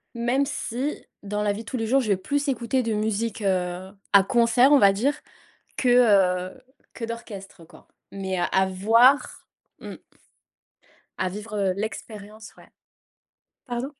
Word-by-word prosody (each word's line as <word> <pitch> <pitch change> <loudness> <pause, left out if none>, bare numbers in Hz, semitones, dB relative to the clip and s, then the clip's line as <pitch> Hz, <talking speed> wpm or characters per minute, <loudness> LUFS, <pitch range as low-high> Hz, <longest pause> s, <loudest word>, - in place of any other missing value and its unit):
même 245 +4 0
si 270 +1 -4 0.2
dans 210 +1 -3
la 205 -1 +1
vie 205 - -7
de - - -13
tous 255 - -4
les 225 - -2
jours 265 +4 +2
je 225 - -4
vais 195 - +2
plus 285 +9 -2
écouter 255 0 0
de 225 -2 -2
musique, 215 +1 -2
heu, 185 0 -2 0.2
à 200 -1 +7
concert, 240 +4 +3
on 285 - +7
va 195 -1 +5
dire 265 +9 0 0.6
que, 250 - 0 0.6
heu, 260 - -19 0.3
que 235 - -9
d'orchestre, 205 -6 -8
quoi. - - -19 0.2
Mais 190 -1 -4
à 190 +2 +1
voir 230 +9 +3 0.3
mmh - - -9 1.2
à 185 - 0
vivre, 210 +3 -8
heu, 190 -2 +1
l'expérience 215 0 -7
ouais - - -18 1.0
pardon? 245 +3 -4
220 Hz, 155 wpm, -24 LUFS, 195-245 Hz, 1.2 s, à